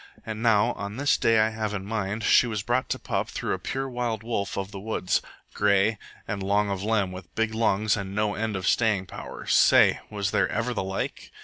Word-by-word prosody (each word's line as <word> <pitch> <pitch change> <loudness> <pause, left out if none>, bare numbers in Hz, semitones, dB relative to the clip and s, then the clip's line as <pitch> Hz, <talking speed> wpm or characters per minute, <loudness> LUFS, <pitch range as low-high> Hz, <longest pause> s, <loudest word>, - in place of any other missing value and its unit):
And 110 -1 -5
now, 115 0 +4
on 100 +2 -6
this 145 +1 +3
day 115 -1 +3
I 110 0 +4
have 110 -1 -3
in 95 -1 -5
mind, 105 0 -3
she 120 - +5
was 105 -3 -3
brought 120 +3 0
to - - -1
pup - - -2
through - - -2
a - - -3
pure 135 0 -3
wild 120 -4 -3
wolf 105 -4 -2
of 100 0 -3
the 100 - -7
woods 100 -3 0 0.3
grey, 100 +1 +2 0.3
and 105 -3 -3
long 100 +1 +1
of 95 -1 -3
limb, 105 -3 +1
with 90 -1 -10
big 115 0 0
lungs 110 -2 +2
and 100 -1 -5
no 105 0 +1
end 110 0 -2
of 95 -1 -3
staying 110 -5 +2
powers. - - -5
Say! - - +6
Was 100 -1 -2
there - - +2
ever 120 +3 -1
the 110 - -2
like? 95 0 -4
105 Hz, 220 wpm, -26 LUFS, 100-115 Hz, 0.3 s, Say